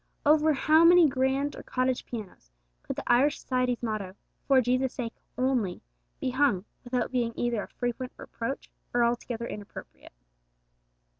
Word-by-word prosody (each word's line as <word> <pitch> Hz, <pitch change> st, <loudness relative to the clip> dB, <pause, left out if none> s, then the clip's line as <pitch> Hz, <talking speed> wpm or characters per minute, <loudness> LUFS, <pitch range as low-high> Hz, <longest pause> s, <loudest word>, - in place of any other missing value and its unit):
Over 305 Hz, +1 st, +5 dB
how 310 Hz, +3 st, +4 dB
many 345 Hz, -1 st, +8 dB
grand 265 Hz, +2 st, 0 dB
or -, -, -8 dB
cottage 255 Hz, 0 st, -1 dB
pianos 205 Hz, -, -8 dB, 0.3 s
could -, -, -5 dB
the -, -, -5 dB
Irish 270 Hz, +5 st, +3 dB
Society's 250 Hz, -2 st, -1 dB
motto, 210 Hz, -4 st, -3 dB, 0.3 s
'For 270 Hz, -2 st, +6 dB
Jesus' 255 Hz, +1 st, +1 dB
sake 235 Hz, -3 st, -4 dB, 0.2 s
only,' 250 Hz, -8 st, 0 dB, 0.4 s
be 255 Hz, -, -1 dB
hung, 250 Hz, -8 st, +2 dB, 0.2 s
without 250 Hz, 0 st, -1 dB
being 240 Hz, -3 st, 0 dB
either 240 Hz, -3 st, 0 dB
a -, -, -7 dB
frequent 245 Hz, +1 st, -4 dB
reproach, 235 Hz, +4 st, -5 dB, 0.2 s
or 240 Hz, -, +4 dB
altogether 235 Hz, 0 st, -1 dB
inappropriate? 205 Hz, -3 st, -9 dB
250 Hz, 145 wpm, -28 LUFS, 235-270 Hz, 0.4 s, many